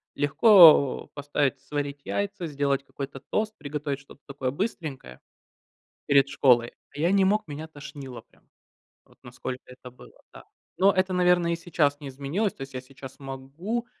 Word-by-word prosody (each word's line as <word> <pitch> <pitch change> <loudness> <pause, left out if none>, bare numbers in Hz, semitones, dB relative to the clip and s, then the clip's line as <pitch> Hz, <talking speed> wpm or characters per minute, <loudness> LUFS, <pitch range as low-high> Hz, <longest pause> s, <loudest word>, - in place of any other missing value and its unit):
легко 155 - +6
поставить 145 -1 -1
сварить 145 -1 -4
яйца, 200 -3 -3
сделать 140 -2 -1
какой-то 140 0 -7
тост, 215 0 -1
приготовить 145 -1 -4
что-то 140 0 -17
такое 140 -2 -3
быстренькое 145 - -5 0.9
перед 140 -1 +4
школой. 120 -4 +3 0.2
А - - -10
я 170 +5 +2
не 195 -1 +4
мог, 210 +1 +1
меня 155 +2 -7
тошнило 140 -5 -10
прям, - - -31 0.6
вот - - -26
насколько 125 +1 -7
это 125 0 -12
было, 125 - -17
да. - - -13 0.3
Но 195 +2 +5
это, 185 -1 0
наверное, 180 -1 +3
и - - 0
сейчас 155 -4 0
не 140 - -7
изменилось, 145 +11 -2
то - - -10
есть 135 0 -9
я 130 - -3
сейчас 135 +1 -12
могу, 140 - -5
145 Hz, 160 wpm, -26 LUFS, 135-175 Hz, 0.9 s, легко